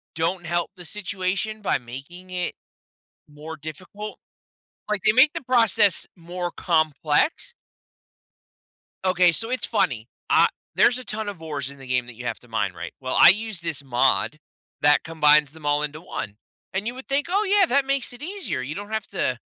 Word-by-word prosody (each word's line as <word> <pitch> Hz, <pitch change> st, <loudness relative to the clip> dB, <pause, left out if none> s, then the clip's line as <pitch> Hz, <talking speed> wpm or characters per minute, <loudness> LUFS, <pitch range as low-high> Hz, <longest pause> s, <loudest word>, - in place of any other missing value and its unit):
don't 170 Hz, +2 st, -1 dB
help 175 Hz, +1 st, -1 dB
the 180 Hz, -1 st, -11 dB
situation 200 Hz, +3 st, -2 dB
by 205 Hz, -, +1 dB
making 140 Hz, +10 st, -10 dB
it 180 Hz, -1 st, -2 dB, 0.7 s
more 150 Hz, +2 st, -8 dB
difficult. 185 Hz, +8 st, -8 dB, 0.7 s
Like, 210 Hz, -1 st, 0 dB
they 215 Hz, -, +7 dB
make 265 Hz, +6 st, +6 dB
the 335 Hz, -, -4 dB
process 225 Hz, -6 st, +3 dB
more 175 Hz, +1 st, -4 dB
complex. 155 Hz, -, +1 dB, 1.5 s
Okay, 185 Hz, -2 st, +4 dB
so 225 Hz, +8 st, -2 dB
it's 255 Hz, 0 st, 0 dB
funny. 135 Hz, -, 0 dB, 0.2 s
Ah -, -, +6 dB, 0.3 s
there's 245 Hz, -, +5 dB
a -, -, -8 dB
ton 215 Hz, -2 st, -4 dB
of 200 Hz, -5 st, -6 dB
ores 145 Hz, -4 st, -4 dB
in 140 Hz, 0 st, -12 dB
the 135 Hz, -, -11 dB
game 125 Hz, -1 st, +1 dB
that 125 Hz, -, -10 dB
you 125 Hz, +2 st, -9 dB
have -, -, -3 dB
to 125 Hz, -, -19 dB
mine 105 Hz, -5 st, -1 dB
right. 85 Hz, 0 st, -7 dB
Well, 130 Hz, -1 st, -2 dB
I -, -, +10 dB
use 215 Hz, 0 st, +1 dB
this 160 Hz, -4 st, -3 dB
mod 135 Hz, +3 st, +2 dB, 0.4 s
that 145 Hz, 0 st, +5 dB
combines 150 Hz, -3 st, +4 dB
them 160 Hz, -1 st, -13 dB
all 145 Hz, 0 st, +2 dB
into 150 Hz, +1 st, -4 dB
1. 105 Hz, -, -6 dB, 0.4 s
And 195 Hz, +2 st, -1 dB
you 240 Hz, -, -2 dB
would 260 Hz, -, -10 dB
think, 280 Hz, +1 st, +1 dB
"Oh 400 Hz, +4 st, +2 dB
yeah, 400 Hz, -1 st, +5 dB
that 280 Hz, -3 st, +2 dB
makes 275 Hz, -2 st, 0 dB
it 245 Hz, -, -12 dB
easier. 365 Hz, -, -3 dB
You 140 Hz, +5 st, -5 dB
don't 205 Hz, +3 st, -7 dB
have 220 Hz, -1 st, -2 dB
to 130 Hz, -10 st, -1 dB
175 Hz, 185 wpm, -24 LUFS, 145-215 Hz, 1.5 s, I